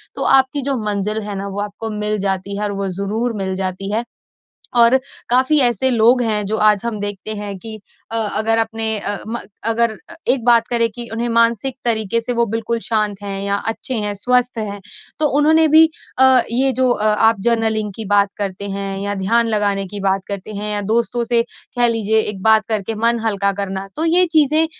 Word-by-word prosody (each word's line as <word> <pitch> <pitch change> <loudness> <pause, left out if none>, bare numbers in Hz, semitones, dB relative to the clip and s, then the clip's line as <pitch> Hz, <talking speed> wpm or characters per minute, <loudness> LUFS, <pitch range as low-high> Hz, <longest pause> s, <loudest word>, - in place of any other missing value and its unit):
तो - - -6 0.2
आपकी 265 +2 -2
जो 275 +1 -1
मंज़िल 210 +1 -2
है 205 -1 -6
ना 200 +1 -5
वो 200 +1 -5
आपको 210 +2 -6
मिल 210 0 -1
जाती 195 +1 -3
है 210 - -3
और 205 - -3
वो 195 - -2
ज़रूर 225 +4 -2
मिल 190 0 -3
जाती 190 +1 -4
है। 225 +2 -1 0.8
और 235 +2 +6 0.3
काफ़ी 260 +5 +4
ऐसे 245 0 +4
लोग 240 +1 +3
हैं 210 -2 0
जो 220 - -2
आज 210 -1 +4
हम 225 -3 -3
देखते 205 0 -4
हैं 205 -1 -6
कि 220 +1 -6 0.3
अ, - - -1 0.2
अगर 225 +1 +2
अपने 225 -1 0
अ, 205 0 -1
म 235 +1 -3 0.3
अगर 230 +1 +2 0.2
अ, - - -6
एक 250 -2 +3
बात 235 -2 +5
करें 235 -1 +2
कि 235 +2 -4
उन्हें 235 +1 -2
मानसिक 230 +2 +1
तरीके 225 -1 +1
से 245 +2 -2
वो 235 0 +1
बिल्कुल 225 +2 -3
शांत 215 -3 0
हैं 195 -1 -5
या 200 0 0
अच्छे 225 +3 -3
हैं 205 -1 -3
स्वस्थ 250 +3 +1
हैं। 205 -2 -5 0.4
तो 305 - +2
उन्होंने 315 +2 +4
भी 315 +2 +7 0.3
अ, 265 - +6 0.3
ये 265 +3 +3
जो 260 0 +1
अ, 215 - 0
आप 215 0 +3
जर्नलिंग 220 -2 +1
की 225 - -5
बात 205 0 +2
करते 200 0 -4
हैं 195 0 -4
या 200 0 -2
ध्यान 225 +5 +1
लगाने 205 -2 0
की 205 +2 -7
बात 195 0 0
करते 200 +1 -5
हैं 210 +1 -3
या 205 - 0
दोस्तों 235 +1 0
से 235 0 +2 0.4
कह 240 - +6
लीजिए 220 -1 +2
एक 195 -2 -4
बात 220 0 +4
करके 220 0 -1
मन 230 +1 +1
हल्का 200 -2 0
करना, 195 0 -5
तो 315 - -1
ये 350 +3 +5
चीज़ें 310 +1 +3
220 Hz, 210 wpm, -18 LUFS, 205-235 Hz, 0.8 s, भी